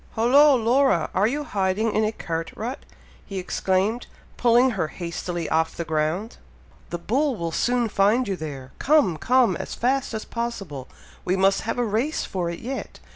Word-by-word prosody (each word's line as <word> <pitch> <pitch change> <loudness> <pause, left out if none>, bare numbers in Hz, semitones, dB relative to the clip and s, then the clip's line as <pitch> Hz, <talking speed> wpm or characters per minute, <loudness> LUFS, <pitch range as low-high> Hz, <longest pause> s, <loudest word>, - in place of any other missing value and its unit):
"Hollo, 270 +6 +5
Laura! 240 - +2
are 200 +3 +3
you 290 +5 -2
hiding 205 -3 0
in 215 - +2
a 215 - +1
cart 165 -6 -4
rut?" 245 +5 -4 0.4
he 195 - -7
exclaimed, 190 +5 0 0.3
pulling 245 +1 +4
her 195 -8 -1
hastily 170 0 -4
off 160 +1 0
the 170 - -3
ground. 160 +8 -1 0.5
"The 175 - -3
bull 265 - 0
will 170 -4 -3
soon 240 +6 +1
find 215 +4 +2
you 195 - -1
there! 140 -6 -7
Come! 290 - +3
come! 255 +4 +3
as - - -6
fast 255 -1 0
as 220 - -4
possible! 195 - -5 0.4
we 185 - +1
must 195 +1 +3
have - - -1
a 245 - +1
race 230 +9 -1
for 180 -3 -3
it 170 - -6
yet! 265 +3 -6
215 Hz, 175 wpm, -24 LUFS, 175-245 Hz, 0.5 s, Hollo